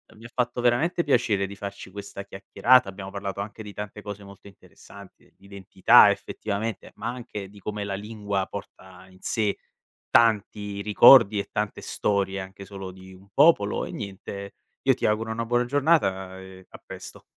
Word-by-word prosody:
mi 110 - -17
ha 120 - -11
fatto 125 -1 -1
veramente 145 +9 +2
piacere 115 -8 +1
di 100 - -9
farci 100 -1 -7
questa 100 0 -8
chiacchierata, 100 +5 +3
abbiamo 95 0 -8
parlato 100 0 -4
anche 105 +2 -8
di 105 -1 -9
tante 105 0 -7
cose 105 -1 -8
molto 100 0 -14
interessanti, 100 0 -16
di 100 - -22
identità 100 -1 +5
effettivamente, 110 +1 -4
ma - - -6
anche 105 -5 -7
di 100 0 -15
come 105 0 -4
la 100 -1 -3
lingua 100 -2 -3
porta 95 -2 -10
in 95 - -19
sé 105 0 -1 0.5
tanti 105 -3 +2
ricordi 105 0 +7
e - - -5
tante 105 0 -3
storie, 100 -1 -1
anche 95 +1 -9
solo 95 -1 -8
di 95 0 -14
un 95 +2 -17
popolo. 140 -9 +4
E - - -8
niente, 100 -1 -7 0.3
io - - +4
ti - - -3
auguro 110 +1 0
una 115 +1 -3
buona 120 +1 +1
giornata 120 - +1
e 95 -1 -13
a - - -13
presto. - - -10
100 Hz, 175 wpm, -25 LUFS, 100-110 Hz, 0.5 s, ricordi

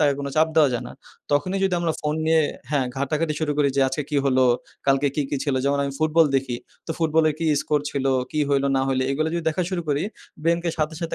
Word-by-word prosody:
তাকে 145 -2 +4
কোন 140 - -4
চাপ 160 +1 +4
দেওয়া 155 -3 +6
যায় 120 - -2
না। - - -10 0.4
তখনই 185 +7 +1
যদি 190 - +1
আমরা 170 -2 0
ফোন 150 0 -1
নিয়ে 160 0 +4 0.3
হ্যাঁ। 140 -4 +1
ঘাটাঘাটি 150 +3 -1
শুরু 155 -2 0
করি 145 -1 +4
যে - - +3
আজকে 135 +3 -2
কী 150 - 0
হলো, 130 -1 +3 0.4
কালকে 135 +1 +3
কি, 150 - +1
কি, - - 0
ছিল। 140 -3 0
যেমন 140 0 +1
আমি 140 - -3
ফুটবল 155 +1 +4
দেখি। 130 -2 -2 0.3
তো - - -6
ফুটবলের 160 -1 +2
কি 165 - -1 0.2
স্কোর 150 -1 +1
ছিল, 140 -2 -2 0.3
কি 155 - 0
হইল 140 -1 +2
না - - +2
হইল 130 -1 +1
এইগুলা 155 +3 0
যদি 170 - -1
দেখা 160 +3 -1
শুরু 180 -2 -2
করি, 145 +1 +1 0.4
ব্রেইনকে 170 +1 +1
সাথে, 155 +1 -1
সাথে 165 -1 -3
150 Hz, 235 wpm, -23 LUFS, 140-160 Hz, 0.4 s, দেওয়া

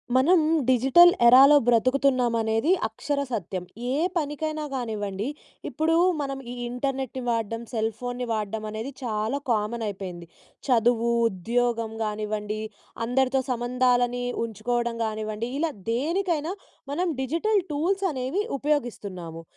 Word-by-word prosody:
మనం 315 +8 +5 0.3
డిజిటల్ 265 +8 +7
ఎరాలో 270 +5 +8
బ్రతుకుతున్నాం 255 +1 +3
అనేది 225 +8 +1 0.2
అక్షర 290 -1 -3
సత్యం. 185 -4 -3 0.3
ఏ - - 0 0.2
పనికైనా 310 0 -2
గానివ్వండి, 210 -4 -3 0.4
ఇప్పుడు 320 +1 +1 0.3
మనం 275 -1 -3
ఈ - - -5 0.2
ఇంటర్నెట్‌ని 265 0 -3
వాడడం, 230 0 -1
సెల్‌ఫోన్‌ని 245 +3 -2
వాడడం, 215 0 -3
అనేది 220 +5 -5
చాలా 220 +3 -1
కామన్ 225 +1 -1
అయిపోయింది. 185 -4 -7 0.4
చదువు, 235 -1 +3 0.2
ఉద్యోగం 230 +3 -1
గానివ్వండి, 210 0 -3 0.5
అందరితో 265 +2 +1
సంబంధాలని 245 0 +1 0.2
ఉంచుకోవడం 235 +2 -2
గానివ్వండి, 215 +1 -3
ఇలా 330 -1 0 0.2
దేనికైనా 330 +4 -1 0.4
మనం 350 +6 0
డిజిటల్ 335 - +1
టూల్స్ 380 +7 0
అనేవి 265 +10 -1 0.2
ఉపయోగిస్తున్నాము. 200 - -3
245 Hz, 105 wpm, -25 LUFS, 220-275 Hz, 0.5 s, ఎరాలో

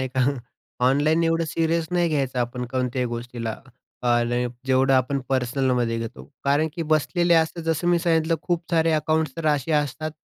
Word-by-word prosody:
नाही 130 - -2
का? 130 - +4 0.6
ऑनलाईन 155 +5 +3
एवढं 165 0 +1
सिरीयस 165 +1 0
नाही 175 -1 +2
घ्यायचं 135 -4 -1
आपण 125 +1 -2
कोणत्याही 125 -1 -1
गोष्टीला, 120 -1 -5 0.5
अ, 120 -1 +3 0.4
जेवढं 135 +1 +3
आपण 130 +2 +1
पर्सनलमध्ये 125 -2 0
घेतो. 110 - -7 0.2
कारण 145 +3 +2
की 170 - -3
बसलेले 170 +3 +2
असतात, 165 +1 +1
जसं 165 +1 -1
मी 175 -1 +4
सांगितलं, 165 -1 +2
खूप 175 -1 -1
सारे 165 -1 +3
अकाउंट्स 155 -1 +1
तर 165 -1 -3
असे 150 0 +1
असतात 150 +1 -1
145 Hz, 165 wpm, -24 LUFS, 125-165 Hz, 0.6 s, का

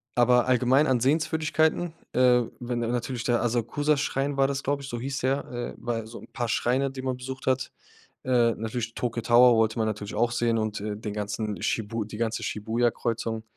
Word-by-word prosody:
aber 125 0 +4
allgemein 130 +4 +4
an 125 -3 +2
Sehenswürdigkeiten, 160 +3 +1 0.2
äh, 125 -1 +5 0.2
wenn 120 0 -2
da 115 - -1
natürlich 120 0 -2
der 120 -1 +2
Asakusa-Schrein 140 +4 0
war 135 - +4
das, 140 0 -3
glaube 140 +1 -1
ich, 135 - -8
so 120 - -4
hieß 135 +3 -4
der, 135 +2 0
äh 120 -1 -4
war 120 0 -3
ja 115 - -5
so 115 - -9
'n - - -13
paar 120 -2 -2
Schreine, 130 +4 +1
die 135 0 -7
man 130 -1 -2
besucht 130 +1 -7
hat. 130 0 0 0.5
Äh, 120 -3 +3
natürlich 115 +1 -4
Tokyo 115 -1 -2
Tower 120 0 +6
wollte 110 0 +2
man 110 -1 +1
natürlich 110 -1 -4
auch 120 +2 +2
sehen 120 -1 +1
und, 110 -1 -2
äh, 105 0 -4
den 105 0 -5
ganzen 105 -1 -3
Shibu 110 0 -1
die 105 - -9
ganze 115 +1 -2
Shibuya-Kreuzung. 115 0 -1
120 Hz, 200 wpm, -26 LUFS, 115-130 Hz, 0.5 s, Tower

